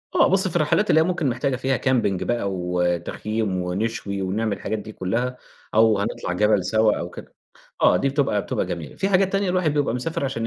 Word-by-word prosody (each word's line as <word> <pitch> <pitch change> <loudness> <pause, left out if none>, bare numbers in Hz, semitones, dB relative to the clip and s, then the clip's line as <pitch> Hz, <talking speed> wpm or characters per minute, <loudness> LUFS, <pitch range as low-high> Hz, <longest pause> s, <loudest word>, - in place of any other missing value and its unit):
آه - - +5
بُصّ، 190 0 +3
في 175 - -5
الرحلات 175 +6 +2
اللي 160 - +5
هي - - +4
ممكن 170 -4 0
محتاجة 125 +2 -1
فيها 130 +1 0
camping 115 -8 +1
بقى 120 -5 -1
وتخييم 90 +3 -1
ونشوي 100 +2 -3
ونعمل 100 +2 -1
الحاجات 110 +2 -3
دي 110 - -9
كلّها، 115 +7 -2 0.4
أو 110 -1 +4
هنطلع 100 -2 -3
جبل 105 0 +2
سوا 110 +1 +2
أو 85 - -4
كده، - - -12 0.5
آه، - - +6
دي 115 - +1
بتبقى 135 -7 0
بتبقى - - -2
جميلة. 85 -4 -6
في 195 - 0
حاجات 195 -1 +2
تانية 195 -1 +1
الواحد 180 -5 +1
بيبقى 145 -5 +1
مسافر 140 +4 -2
عشان 115 -4 -2
115 Hz, 200 wpm, -23 LUFS, 100-145 Hz, 0.5 s, آه